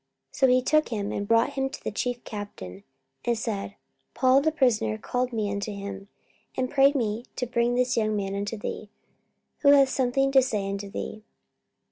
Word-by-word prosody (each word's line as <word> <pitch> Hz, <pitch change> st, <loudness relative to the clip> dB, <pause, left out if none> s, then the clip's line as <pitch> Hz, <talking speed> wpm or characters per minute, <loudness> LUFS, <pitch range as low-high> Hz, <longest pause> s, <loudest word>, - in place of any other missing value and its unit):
44:023:018 -, -, -11 dB
So 265 Hz, -, +6 dB
he 255 Hz, 0 st, +4 dB
took 305 Hz, +3 st, +2 dB
him, 205 Hz, -3 st, -3 dB
and 200 Hz, -, -3 dB
brought 230 Hz, +5 st, +3 dB
him 270 Hz, -1 st, -1 dB
to -, -, -10 dB
the -, -, -3 dB
chief 245 Hz, +3 st, -3 dB
captain, 100 Hz, -, -8 dB, 0.4 s
and 240 Hz, -1 st, 0 dB
said, 205 Hz, -3 st, -4 dB, 0.4 s
Paul 260 Hz, +1 st, +4 dB
the 315 Hz, +2 st, +2 dB
prisoner 225 Hz, -, +1 dB
called 250 Hz, -, -2 dB
me 215 Hz, -3 st, -1 dB
unto 200 Hz, +1 st, -3 dB
him, 200 Hz, -1 st, -7 dB, 0.5 s
and 255 Hz, 0 st, -1 dB
prayed 280 Hz, +1 st, +5 dB
me 230 Hz, -2 st, -1 dB
to 250 Hz, -, -2 dB
bring 240 Hz, 0 st, +1 dB
this 250 Hz, 0 st, +1 dB
young 215 Hz, -2 st, +1 dB
man 195 Hz, -1 st, -2 dB
unto 205 Hz, +3 st, -3 dB
thee, 210 Hz, 0 st, -6 dB, 0.7 s
who 280 Hz, -, +4 dB
hath 275 Hz, -2 st, +6 dB
something 270 Hz, +1 st, +1 dB
to 270 Hz, -1 st, +6 dB
say 210 Hz, -6 st, -1 dB
unto 200 Hz, 0 st, -4 dB
thee. 215 Hz, +1 st, -6 dB
230 Hz, 190 wpm, -26 LUFS, 205-260 Hz, 0.7 s, So